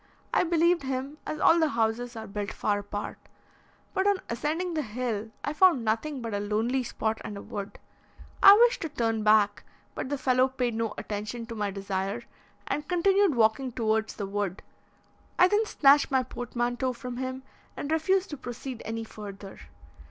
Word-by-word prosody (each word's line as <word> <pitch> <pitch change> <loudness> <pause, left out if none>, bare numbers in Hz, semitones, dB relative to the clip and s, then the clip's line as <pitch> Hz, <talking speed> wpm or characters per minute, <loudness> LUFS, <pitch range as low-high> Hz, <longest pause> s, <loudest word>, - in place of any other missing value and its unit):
I - - +4
believed 340 0 +3
him, 270 +2 -4
as 305 - -3
all 330 +1 +5
the 320 -2 +3
houses 235 0 -1
are 220 -1 -6
built 205 0 -4
far 205 -1 0
apart; 205 +1 -6 0.7
but 380 +1 +1
on 405 -1 +4
ascending 320 +8 -2
the 310 - 0
hill, 225 -3 -3
I 290 - -2
found 305 -7 +4
nothing 245 +5 -1
but 225 -2 -4
a 205 - 0
lonely 220 +5 0
spot 220 -2 -2
and 205 - -6
a - - -7
wood. 200 -1 -6 0.6
I 395 - +11
wished 480 0 +3
to 325 - -3
turn 225 -5 -1
back, 210 -1 +4 0.3
but - - -4
the 285 - -1
fellow 255 -1 +3
paid 255 -2 -2
no 225 -1 -2
attention 215 +3 -5
to 230 0 -7
my 210 -2 -1
desire, 195 +2 -3 0.4
and 295 0 -3
continued 380 -1 +3
walking 235 +3 +2
towards 220 -1 0
the 205 - -4
wood. 200 -1 -3 0.7
I 365 - +7
then 420 +3 +2
snatched 285 -4 +5
my 265 -1 +2
portmanteau 245 +1 -2
from 245 0 -7
him, 260 0 -4 0.3
and 285 - -4
refused 370 +4 +1
to 295 - -5
proceed 245 -1 -7
any 225 +1 -3
further. 200 -3 -9
245 Hz, 175 wpm, -28 LUFS, 215-295 Hz, 0.7 s, I